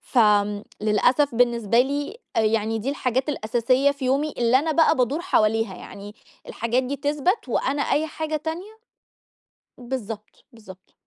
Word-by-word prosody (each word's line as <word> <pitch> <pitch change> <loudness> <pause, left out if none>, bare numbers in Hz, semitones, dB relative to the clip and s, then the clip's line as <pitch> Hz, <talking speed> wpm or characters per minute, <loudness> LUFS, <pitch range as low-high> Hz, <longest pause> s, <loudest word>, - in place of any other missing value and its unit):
فآمم، 210 -3 +2 0.2
للأسف 245 +6 +2
بالنسبة 235 -2 +3
لي 285 - -2 0.2
آآ - - +4
يعني 220 0 0
دي 250 +6 -2
الحاجات 260 0 -1
الأساسية 255 +2 +1
في 280 -1 -6
يومي 280 +4 0
اللي 240 +2 +4
أنا 315 +3 -1
بقى 320 0 +4
بادور 260 +5 0
حواليها، 225 - +1
يعني 200 +2 -10 0.3
الحاجات 235 +3 -1
دي 265 +2 -3
تِثبَت 290 - -1
وأنا 270 +4 0
أي 300 +3 +1
حاجة 310 0 -3
تانية 350 +8 -6 1.0
بالضبط، 230 -4 -7
بالضبط. 190 -5 -15
250 Hz, 140 wpm, -23 LUFS, 225-290 Hz, 1.0 s, آآ